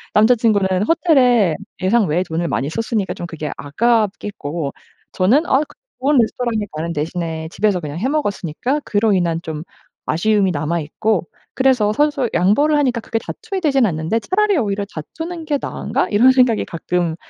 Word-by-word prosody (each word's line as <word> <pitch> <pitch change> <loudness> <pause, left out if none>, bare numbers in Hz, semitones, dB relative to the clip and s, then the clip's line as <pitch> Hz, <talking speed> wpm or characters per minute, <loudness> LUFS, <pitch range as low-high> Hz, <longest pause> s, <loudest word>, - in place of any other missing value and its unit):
남자 220 +4 +6
친구는 215 -4 +2 0.2
호텔에 250 - +3 0.3
예상 210 +2 +3
외에 170 +5 +1
돈을 170 0 -2
많이 140 +1 -2
썼으니까 225 -1 -2
좀 175 - -6
그게 155 -2 -5
아깝겠고 190 -4 -1 0.4
저는 245 - +3
아 270 - +3
그 - - -18 0.2
좋은 280 +2 +2
레스토랑에 230 -2 0
가는 160 +2 -4
대신에 160 +1 -3
집에서 205 -3 +1
그냥 150 +2 -5
해 250 - 0
먹었으니까 255 - -1
그로 210 0 +2
인한 170 -3 0
좀 155 -1 -5 0.5
아쉬움이 200 +3 +2
남아 155 +2 -1
있고 175 +4 -1 0.3
그래서 255 -6 +2
서로서로 285 -3 +1
양보를 290 +12 +3
하니까 255 -5 +1
크게 225 0 -2
다투게 400 - -5
되진 275 -7 +3
않는데 165 +5 -1
'차라리 410 -1 +1
오히려 200 -4 -1
다투는 325 - -6
게 290 -2 0
나은가?' - - -2
이런 240 +5 +5
생각이 250 -4 +3
가끔 170 0 -2
210 Hz, 380 characters per minute, -19 LUFS, 170-255 Hz, 0.5 s, 남자